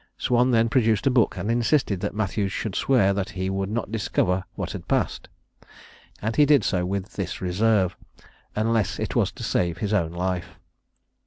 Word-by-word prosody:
Swan 125 +1 +2
then 115 -2 +3
produced 115 -4 +2
a 135 - +4
book, 120 -7 +2
and 100 +5 -2
insisted 120 - +1
that 100 +1 -3
Matthews 100 -1 -1
should 105 +1 -3
swear 100 -6 +3
that 100 -1 -2
he 95 +1 -1
would 95 0 -2
not 110 -1 -3
discover 95 -4 0
what - - -4
had - - -8
passed: - - -1 0.9
and 110 +2 -1
he 150 - +6
did 145 -2 +5
so, 90 -2 0
with 100 +1 -3
this 95 -3 -4
reserve, 95 0 +1 0.6
"unless 110 -4 +1
it - - -3
was - - +2
to - - -9
save 85 -1 0
his 105 +3 -2
own 85 -6 +1
life." 90 0 -3
100 Hz, 180 wpm, -24 LUFS, 95-115 Hz, 0.9 s, he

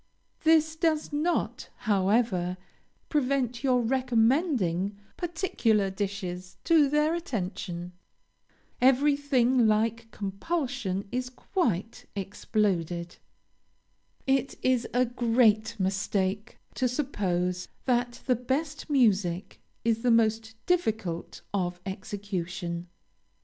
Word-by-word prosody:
This 315 -1 +4
does 315 -2 0
not, 320 +4 -1 0.2
however, 195 -3 +2 0.5
prevent 260 -4 0
your 250 -2 +3
recommending 230 - +1 0.2
particular 290 - +1
dishes 185 -2 -4
to 320 -4 +5
their 300 +2 +2
attention. 180 - -4 0.9
Everything 265 -2 +4
like 225 +1 +1
compulsion 210 - -3
is 250 0 -2
quite 235 - -2
exploded. 180 -4 -1 1.1
It 270 0 +1
is 255 -2 +2
a 250 +1 +3
great 230 -2 +2
mistake 195 +2 -1 0.2
to 255 - +1
suppose 185 -9 -1 0.2
that 245 -1 0
the 255 - +3
best 275 +6 -2
music 200 - +1 0.2
is 230 -1 +2
the 250 - +2
most 225 -1 +2
difficult 220 - -1
of 180 -3 -1
execution. 185 -3 -4
225 Hz, 90 wpm, -28 LUFS, 195-265 Hz, 1.1 s, to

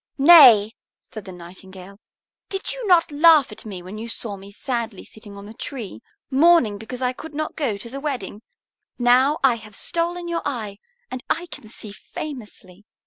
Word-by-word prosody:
"Nay," 270 -9 +8 0.3
said 215 -3 -11
the 190 - -9
Nightingale, 185 +2 -13 0.5
"did 390 0 -2
you - - -6
not 345 -4 +4
laugh 300 -3 +5
at 210 - -7
me 185 -4 -8
when 195 +4 -9
you 230 - -6
saw 225 -2 -6
me 195 +1 -13
sadly 230 -2 -5
sitting 205 -2 -12
on 200 - -11
the 215 - -11
tree, 225 - -7 0.3
mourning 270 -8 +4
because 245 +4 -7
I 250 0 0
could 310 +3 -11
not 310 +1 -4
go 250 -10 -2
to 210 - -10
the 270 +4 -7
wedding? 250 -8 -5 0.6
Now 255 +4 +3
I 250 -3 +4
have 215 -2 -11
stolen 345 +1 -1
your 340 -1 -2
eye, 215 -8 -5 0.3
and 255 -1 -6
I 350 - -1
can 215 - -10
see 215 -1 -11
famously. 210 -6 -10
235 Hz, 180 wpm, -22 LUFS, 205-290 Hz, 0.6 s, Nay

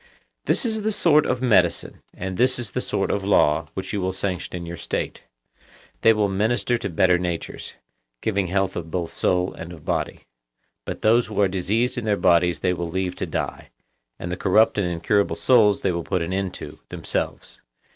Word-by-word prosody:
This - - +2
is 220 -2 0
the 215 +1 0
sort 155 -7 +4
of 125 - -1
medicine, 95 -8 +2
and 95 +1 -5
this 130 +5 +3
is 120 -6 -5
the - - -2
sort - - -1
of 100 - -1
law, 75 -6 +3
which - - -5
you 100 - -1
will 95 0 0
sanction 95 -1 -3
in 85 -1 -5
your 85 +1 -6
state. - - -4 0.8
They 115 - +6
will 105 -2 +2
minister 110 +5 +1
to 100 - -3
better 90 +1 +3
natures, 90 -2 -4 0.4
giving 100 - 0
health 95 +1 0
both 85 0 -3
of - - -13
soul 90 0 +1
and 85 - -8
of 80 -4 -12
body; - - -2 0.6
but - - -6
those 115 +2 +4
who 105 -2 -4
are 100 - +5
diseased 105 +7 0
in 115 - -6
their 105 -2 +1
bodies 85 -1 +3
they 90 -1 +2
will 85 -1 -4
leave 90 +1 -2
to - - -3
die, - - -4 0.5
and 85 - -5
the 90 - -3
corrupt 105 +3 +3
and 95 - +1
incurable 90 +4 +1
souls 110 -6 +4
they 95 - +1
will 85 -1 -2
put 90 -1 -1
an 85 +3 -3
end 95 -1 -2
to - - -9
themselves. - - -4
95 Hz, 200 wpm, -23 LUFS, 90-110 Hz, 0.8 s, They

